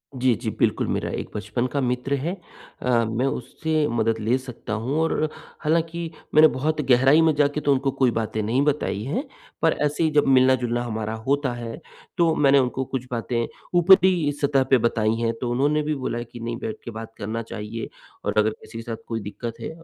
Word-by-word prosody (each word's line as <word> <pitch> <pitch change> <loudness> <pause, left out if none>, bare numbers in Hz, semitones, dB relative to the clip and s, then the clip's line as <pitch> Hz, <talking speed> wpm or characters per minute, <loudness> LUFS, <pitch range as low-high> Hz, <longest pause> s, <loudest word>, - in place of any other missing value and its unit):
जी, 130 -1 +3
जी, - - -4
बिल्कुल। - - +2
मेरा - - -1
एक - - -4
बचपन 105 +4 -2
का 140 - +1
मित्र 125 +2 -1
है 145 +6 -1 0.5
अ, 120 -2 +2
मैं 115 +3 -1
उससे 155 +2 -1
मदद 115 -1 0
ले 115 +4 +1
सकता 125 -4 -7
हूँ 120 +7 -2
और 155 -1 +1 0.3
हालाँकि 165 +1 0 0.3
मैंने 155 +1 +9
बहुत 155 +3 0
गहराई 135 +5 +6
में 160 -1 +4
जाके 145 0 +2
तो 145 - +2
उनको 135 0 0
कोई 130 -3 +4
बातें 110 -1 -2
नहीं 115 +6 +1
बताई 145 -8 0
हैं 155 - -2 0.4
पर 165 - +4
ऐसे 150 +2 0
ही 160 - +3
जब 150 -1 +3
मिलना-जुलना 130 -2 +3
हमारा 110 -2 -3
होता 140 -2 +1
है 120 +3 -6 0.4
तो 170 -2 +4
मैंने 140 -1 +5
उनको 130 0 0
कुछ 130 -1 -4
बातें 115 0 -1 0.3
ऊपरी 180 -3 +5
सतह 140 -2 +3
पे 130 - +7
बताई 110 -2 +1
हैं। 115 0 +1
तो 125 - -1
उन्होंने 145 +5 +2
भी 150 0 -1
बोला 130 -3 -3
है 120 - -3
कि 120 +1 -11
नहीं 115 0 -4
बैठ 220 -1 -4
के 120 - -6
बात 115 0 -8
करना 110 +3 -3
चाहिए 110 +1 -6 0.4
और 100 +1 -1
अगर 105 0 +4
किसी - - -10
के 115 - -4
साथ 115 0 -4
कोई 115 -1 -2
दिक्कत 110 +3 -6
है - - -5
130 Hz, 205 wpm, -24 LUFS, 115-150 Hz, 0.5 s, मैंने